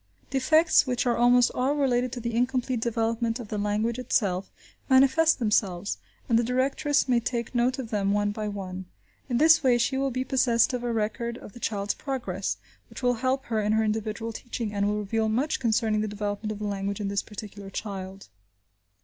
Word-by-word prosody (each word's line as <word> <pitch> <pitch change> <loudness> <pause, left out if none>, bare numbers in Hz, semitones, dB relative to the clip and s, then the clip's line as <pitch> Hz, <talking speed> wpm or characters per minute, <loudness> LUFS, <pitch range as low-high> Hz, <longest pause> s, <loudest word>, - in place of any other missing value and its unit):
Defects, 310 +3 +4
which 250 0 0
are 240 -1 +2
almost 245 +1 +4
all 265 +3 +1
related 255 -3 +1
to 250 - -4
the 235 0 -3
incomplete 250 +1 0
development 230 +1 -1
of 225 -4 -8
the 210 - -2
language 215 +4 0
itself, 195 -6 0 0.4
manifest 275 +5 +5
themselves, 205 -5 0 0.3
and 230 -1 +3
the - - +2
directress 270 +4 +1
may 245 -2 +3
take 235 0 -3
note 245 +1 +1
of 250 -4 -6
them 200 -2 +1
one 205 0 +1
by 215 0 -4
one. 190 -2 -5 0.4
In 240 - +1
this 320 +3 +6
way 255 -4 +4
she 265 +3 0
will 275 0 +1
be 255 0 -2
possessed 255 -3 +2
of 245 -1 -2
a 240 - -1
record 230 +2 -2
of 205 - -12
the - - -11
child's 205 -3 -1
progress, 200 - -3 0.3
which - - -10
will 245 0 +3
help 265 +1 0
her 220 -2 -1
in 210 +1 +1
her 220 0 +3
individual 220 +1 -2
teaching, 230 -2 -5
and 200 0 +1
will 210 0 0
reveal 220 +2 -1
much 265 +8 0
concerning 220 -3 +1
the 215 - -1
development 205 +1 -3
of 215 - -5
the 210 - -5
language 200 0 -3
in 205 - -2
this 200 0 0
particular 205 -2 -9
child. 195 -1 -6
230 Hz, 200 wpm, -26 LUFS, 210-250 Hz, 0.4 s, this